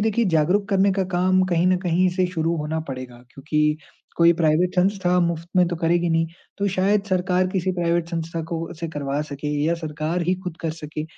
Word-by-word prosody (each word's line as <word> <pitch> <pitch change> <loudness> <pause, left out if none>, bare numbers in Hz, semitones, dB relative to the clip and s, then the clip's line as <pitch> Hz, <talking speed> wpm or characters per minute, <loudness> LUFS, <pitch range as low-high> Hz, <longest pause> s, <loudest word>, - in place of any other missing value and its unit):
देखिए, 220 +2 +1
जागरूक 180 +4 +2
करने 195 0 +3
का 190 0 0
काम 185 +1 +3
कहीं 170 0 +2
न 185 0 +4
कहीं 180 0 +2
से 185 -1 +2
शुरू 165 0 0
होना 155 +1 -2
पड़ेगा, 130 -2 -6
क्योंकि 150 +4 0 0.4
कोई 170 0 +6
प्राइवेट 165 +2 +2
संस्था 180 -1 +2
मुफ़्त 170 -1 -1
में 180 - +5
तो 175 - -3
करेगी 170 +1 +1
नहीं, 165 0 +2 0.3
तो 200 - 0
शायद 195 +2 +2
सरकार 185 0 +2
किसी 185 -1 0
प्राइवेट 170 -1 0
संस्था 165 -1 -3
को 165 - -2
उससे 165 0 -6
करवा 145 -2 -3
सके 145 +1 -4 0.2
या 165 +2 +2
सरकार 160 +1 -3
ही 180 +2 +1
ख़ुद 180 -2 -5
कर 165 - -1
सके। 155 -1 -6
170 Hz, 200 wpm, -23 LUFS, 160-185 Hz, 0.4 s, कोई